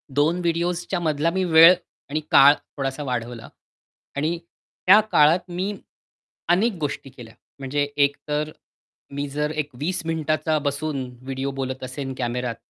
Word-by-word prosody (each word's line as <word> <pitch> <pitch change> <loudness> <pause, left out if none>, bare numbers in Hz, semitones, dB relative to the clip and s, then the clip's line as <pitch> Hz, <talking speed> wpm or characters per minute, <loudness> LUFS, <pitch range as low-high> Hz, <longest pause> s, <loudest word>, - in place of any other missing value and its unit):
2 155 +5 +2
व्हिडिओसच्या 175 +1 -1
मधला 155 -1 0
मी 190 +2 0
वेळ 165 0 +8 0.4
आणि 150 +2 -1
काळ 140 +1 +8 0.2
थोडासा 135 +1 -3
वाढवला. 120 -3 -4 0.7
आणि 155 +4 -1 0.5
त्या 200 +3 +9
काळात 170 +5 +4
मी 185 +4 -2 0.8
अनेक 205 +7 +3
गोष्टी 140 -2 -4
केल्या. 120 -4 -13 0.3
म्हणजे 140 +2 -1 0.2
एकतर 150 +2 -3 0.6
मी 145 0 -2
जर 150 +2 -2
एक 145 - -10
20 180 +6 -2
मिनिटाचा 155 -1 0
बसून 145 -1 -2 0.2
व्हिडिओ 135 +1 -3
बोलत 130 0 -4
असेन, 130 +1 -5
कॅमेरात, 120 -1 -2
150 Hz, 130 wpm, -23 LUFS, 135-170 Hz, 0.8 s, त्या